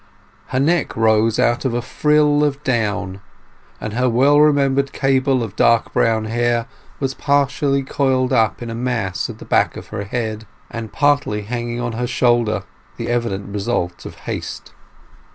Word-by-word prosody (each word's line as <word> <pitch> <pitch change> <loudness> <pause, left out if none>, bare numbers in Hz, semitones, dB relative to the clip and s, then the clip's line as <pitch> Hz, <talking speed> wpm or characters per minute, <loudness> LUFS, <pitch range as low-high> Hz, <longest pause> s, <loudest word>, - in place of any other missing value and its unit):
Her 130 - -1
neck 160 0 +1
rose 110 0 +3
out 120 +1 +2
of 130 -3 -1
a 120 - 0
frill 150 0 +2
of 145 0 -1
down, 105 -7 -1 0.6
and 105 - -5
her 125 +2 +1
well 135 +5 +4
remembered 140 -2 +3
cable 135 -2 +1
of 105 -3 -7
dark 115 0 +3
brown 110 -1 +2
hair 120 +1 0 0.3
was 135 -1 -1
partially 140 0 +1
coiled 130 -2 0
up 115 +1 +1
in 115 - -5
a - - -4
mass 115 -6 -2
at - - -8
the - - -11
back - - +1
of - - -10
her 100 - -5
head 110 0 -4 0.2
and 115 -2 -6
partly 145 -8 +1
hanging 120 +2 -4
on 120 -1 -2
her 120 +2 -2
shoulder—the 120 -3 -1
evident 100 -5 -2
result 100 -4 -2
of - - -10
haste. - - -6
120 Hz, 160 wpm, -19 LUFS, 110-135 Hz, 0.6 s, well